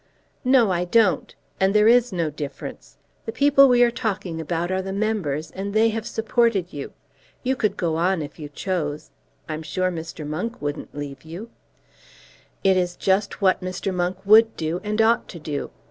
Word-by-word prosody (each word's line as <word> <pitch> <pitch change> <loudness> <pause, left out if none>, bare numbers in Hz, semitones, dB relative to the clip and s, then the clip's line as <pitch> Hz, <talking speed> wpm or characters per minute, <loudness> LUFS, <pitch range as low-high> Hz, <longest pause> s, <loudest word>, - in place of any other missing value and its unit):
"No, 250 -5 +4
I 175 0 0
don't. 185 -4 +2 0.2
And 190 +2 +2
there 210 +1 +6
is 245 0 +5
no 170 -4 -1
difference. 145 -1 -8 0.3
The - - -1
people 275 +1 +5
we 245 -1 +5
are 240 - +3
talking 195 -8 -3
about 170 +2 -2
are 190 0 0
the 190 0 -5
members, 190 -8 -2
and 200 +2 -5
they 225 +1 +5
have 225 0 -4
supported 225 -5 +1
you. 140 -1 -6 0.5
You 260 +1 +1
could 215 -5 -1
go 165 -2 0
on 175 -1 +1
if 145 - -10
you 150 -1 -7
chose. 150 -2 -3 0.4
I'm 155 0 -4
sure 185 +3 -1
Mr. 165 -2 -6
Monk 180 +11 -4
wouldn't 145 0 -5
leave 140 -1 -6
you." 175 +9 -9 1.1
"It 190 -1 +4
is 175 -1 0
just 195 +1 0
what 190 -1 +3
Mr. 185 +1 -3
Monk 180 +1 -1
would 220 +2 +6
do, 165 +2 -2
and 210 +1 -2
ought 225 +2 +3
to 175 - -8
do. 150 -2 -4
185 Hz, 180 wpm, -23 LUFS, 160-220 Hz, 1.1 s, there